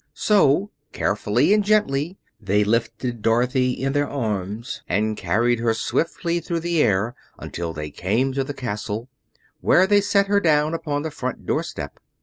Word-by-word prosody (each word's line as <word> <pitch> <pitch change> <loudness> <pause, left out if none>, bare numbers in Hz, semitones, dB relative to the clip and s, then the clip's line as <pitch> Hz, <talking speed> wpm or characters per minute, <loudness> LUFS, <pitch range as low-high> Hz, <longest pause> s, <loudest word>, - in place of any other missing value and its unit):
So, 200 -1 +3 0.2
carefully - - +2
and 210 -1 +3
gently, 190 -5 +1 0.2
they 105 0 +1
lifted 115 +2 -1
Dorothy 125 +3 +2
in 135 +2 -2
their 145 0 +1
arms 110 -3 -3
and 110 +3 +1
carried 115 +6 +1
her 115 -1 +1
swiftly 170 +7 -1
through 170 -1 -3
the 170 -1 +1
air 110 +1 +2 0.2
until 85 -1 -5
they 75 -2 -6
came 115 - 0
to 135 0 0
the 140 +1 -6
castle, 115 -1 -4 0.5
where 185 - +4
they 205 +1 +4
set 200 0 +2
her 200 0 +3
down 155 -3 +2
upon 145 -3 -2
the 160 - -4
front 130 -3 -5
doorstep. - - -3
130 Hz, 155 wpm, -23 LUFS, 110-165 Hz, 0.5 s, where